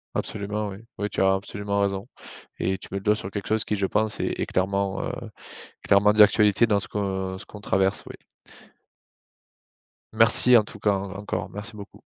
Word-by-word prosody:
Absolument 105 0 -3
oui, 95 - -8 0.2
oui 105 0 -1
tu - - -2
as 95 0 +4
absolument 100 +1 -2
raison 100 0 -1 0.5
et 95 0 0
tu - - -12
mets 100 - -2
le - - -15
doigt 105 +1 +3
sur 95 -2 -7
quelque 100 -1 -5
chose 110 -1 +1
qui 105 - -1
je 95 -1 0
pense 110 +1 0
est - - -2
est - - 0
clairement, 100 +1 -1
heu, - - -3
est - - -10 0.4
clairement 105 +1 +5
d'actualité 105 +1 +5
dans 105 -3 +2
ce - - -1
que 95 -2 -3
qu'on 105 - -12
traverse, 95 0 0
oui. - - -9 2.0
Merci 125 0 +6
en 115 - +6
tout 105 - -12
cas 105 0 +2
hein, 100 0 -3
encore 100 - -4
merci 105 +2 -8
beaucoup. 100 -1 -12
100 Hz, 190 wpm, -25 LUFS, 95-105 Hz, 2.0 s, Merci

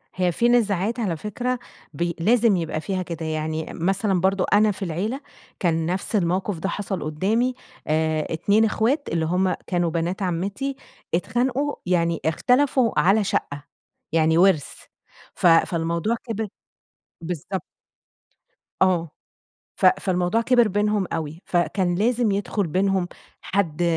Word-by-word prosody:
هي 180 -1 +1
في 235 +8 +2
نزاعات 220 -1 +1
على 190 -8 -1
فكرة 245 +7 -3 0.3
بي 170 +2 -2
لازم 225 +3 +4
يبقى 160 -2 -3
فيها 190 +1 -2
كده، 165 -2 -6
يعني 155 0 -3
أم 165 - -5
مثلًا 195 -1 +1
برضه 190 0 +2
أنا 210 +1 +5
في 195 0 -5
العيلة 200 - -3 0.4
كان 165 -3 +1
نفس 185 +6 -2
الموقف 185 0 0
ده 195 - -2
حصل 195 -2 -3
قدّامي 215 +12 0 0.3
آآ، 155 0 +1
اتنين 205 +7 +3
أخوات 240 +7 0
اللي 165 -1 0
هُم 180 +3 +1
كانوا 175 -2 +1
بنات 170 +4 -2
عَمّتي 195 +10 -2 0.4
اتخانقوا 250 +10 0
يعني 170 -2 +1
اختلفوا 250 - +2
على 200 +4 +4
شقة، 145 -6 -2 0.5
يعني 160 0 +3
وِرث، 175 -5 +3 0.6
ف - - +2
فالموضوع 170 +5 +2
كبر 225 -2 -3 0.7
بالضبط. 180 +3 -4 1.2
آه، 175 -4 +2 0.6
ف - - 0
فالموضوع 180 +3 +2
كبر 240 -1 +4
بينهم 205 -1 0
أوي، 160 +1 -4
ف 175 - 0
كان 175 0 +1
لازم 230 +2 +1
يدخل 200 -1 -1
بينهم 190 +2 +1 0.3
حد 175 -4 -1
185 Hz, 135 wpm, -23 LUFS, 170-215 Hz, 1.2 s, أنا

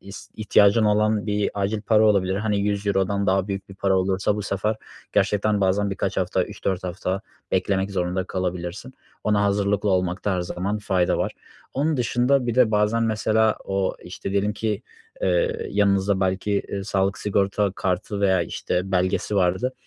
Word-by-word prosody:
is 100 +1 -11
ihtiyacın 105 0 +4
olan 105 0 +2
bir 105 -1 0
acil 100 +1 -1
para 110 0 +4
olabilir. 95 -3 +3
Hani, 105 -1 0
€100'dan 100 -1 0
daha 95 +1 +1
büyük 100 -1 -4
bir 95 - -11
para 95 -1 +1
olursa 95 +2 0
bu 105 - -3
sefer 105 +2 -1 0.4
gerçekten 105 +1 +2
bazen 100 +1 +1
birkaç 95 - -2
hafta, - - +1
3-4 95 -1 -3
hafta 90 +1 -3 0.3
beklemek 95 +1 +1
zorunda 90 0 -1
kalabilirsin. 90 +6 -4 0.3
Ona 105 -1 +2
hazırlıklı 100 0 +1
olmakta 95 +1 0
her 90 - -1
zaman 95 +4 -3
fayda 95 -4 +1
var. - - -1 0.4
Onun 150 +2 +1
dışında 125 +2 +2
bir 120 - -1
de 125 -3 +4
bazen 105 +2 +2
mesela 110 0 +2
o, 95 -1 -1
işte, - - -6
diyelim 100 +1 +1
ki, 105 0 -2 0.4
eee, 470 -2 +1
yanınızda 100 -1 +2
belki, 95 +2 0 0.2
eee, 100 -1 -4
sağlık 100 -1 0
sigorta 100 -1 0
kartı 95 +2 -2
veya, 95 -3 +3
işte, 90 +3 -3
belgesi 95 +3 0
vardı. 95 +8 +1
100 Hz, 160 wpm, -23 LUFS, 95-105 Hz, 0.4 s, ihtiyacın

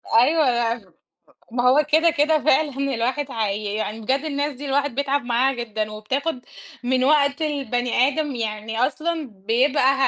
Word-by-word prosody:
أيوه 235 - +2 0.6
ما 245 0 0
هو 290 +3 +4
كده 325 +2 +5
كده 310 +1 +2
فعلًا 275 -2 +1
الواحد 255 +5 -1
هي 210 -2 -2
يعني 215 0 -3
بجد 265 +7 -1
الناس 290 0 -2
دي 280 +3 -8
الواحد 280 -1 0
بيتعب 280 0 0
معاها 245 +3 +2
جدًا 220 -3 -4
وبتاخد 255 +7 -3 0.4
من 255 +1 +1
وقت 285 +1 +3
البني 255 -4 +1
آدم، 290 -1 -2
يعني 225 0 -4
أصلًا 310 +1 -3 0.2
بيبقى 260 +3 +3
265 Hz, 145 wpm, -22 LUFS, 230-290 Hz, 0.6 s, كده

